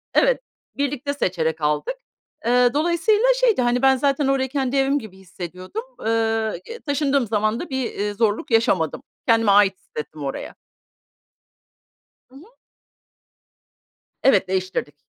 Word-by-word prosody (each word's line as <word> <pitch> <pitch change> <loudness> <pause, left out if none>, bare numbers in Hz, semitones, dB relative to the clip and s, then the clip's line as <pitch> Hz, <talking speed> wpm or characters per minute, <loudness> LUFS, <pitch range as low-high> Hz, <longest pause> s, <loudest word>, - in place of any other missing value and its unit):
Evet, - - +3 0.4
birlikte 285 0 -2
seçerek 165 - -1
aldık. 150 - 0 0.5
Eee, 245 +1 +4
dolayısıyla 345 +9 +2
şeydi. 465 - +3
Hani, 245 0 +1
ben 265 0 +5
zaten 275 +1 +1
orayı 265 -1 +1
kendi 270 -1 -1
evim 275 +1 +2
gibi 205 -5 -12
hissediyordum. 185 - -7 0.2
Eee, 225 - +2 0.6
y 475 - -9
taşındığım 280 -3 +1
zaman 215 +2 0
da 345 - -6
bir, 265 -1 -1
eee, 205 +1 -3
zorluk 215 +2 0
yaşamadım. 225 - +2 0.3
Kendimi 225 -3 +4
ait 200 -1 +4
hissettim 150 0 -8
oraya. 135 - -5 1.7
Hı 260 - -21
hı. 280 - -13 1.8
Evet, 200 -8 +4
değiştirdik. 185 -5 -2
245 Hz, 125 wpm, -22 LUFS, 190-280 Hz, 1.8 s, ben